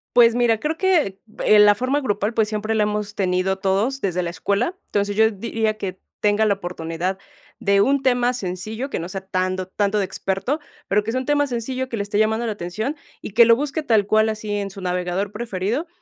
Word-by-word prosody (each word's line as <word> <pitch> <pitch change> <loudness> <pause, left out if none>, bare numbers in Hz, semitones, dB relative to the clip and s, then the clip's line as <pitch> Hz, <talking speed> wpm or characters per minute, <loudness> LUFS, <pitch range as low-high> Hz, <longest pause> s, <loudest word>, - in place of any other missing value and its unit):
Pues 235 -1 +6
mira, 235 -3 +3
creo 310 +2 -2
que, 335 - +2 0.3
eh, 215 - +6
la 210 0 +8
forma 255 +6 0
grupal, 210 -3 -1
pues, 220 -2 +3
siempre 215 +1 -2
la 215 - +3
hemos 210 0 -2
tenido 185 0 0
todos 200 +8 0
desde 180 -4 -1
la 175 - -2
escuela. 200 - -1
Entonces, 205 0 -1
yo 220 +1 +4
diría 220 +1 -1
que 185 -2 -5 0.2
tenga 210 +1 +2
la 205 - +3
oportunidad 175 -1 -4 0.4
de 200 0 +3
un 275 +3 +2
tema 245 -1 +2
sencillo, 215 +5 -4
que - - -2
no 170 +2 -5
sea 195 0 -5
tanto- 185 0 -1
tanto 205 +2 0
de 200 - +1
experto, 195 +11 -2 0.3
pero 205 +1 +2
que 225 - -3
sea 255 - 0
un 260 - -5
tema 290 0 +2
sencillo 255 +2 -3
que 230 - -3
le 200 - -1
esté 205 +1 -1
llamando 220 +2 +2
la 225 - -1
atención, 210 - -3 0.3
y - - -6
que 230 +2 +7
lo 230 - +6
busque 290 +4 -2
tal 220 -7 +2
cual 215 +1 +3
así 215 -1 -4
en 205 -1 -2
su 195 0 -10
navegador 180 +2 -2
preferido, 225 - -2
210 Hz, 215 wpm, -22 LUFS, 195-240 Hz, 0.4 s, la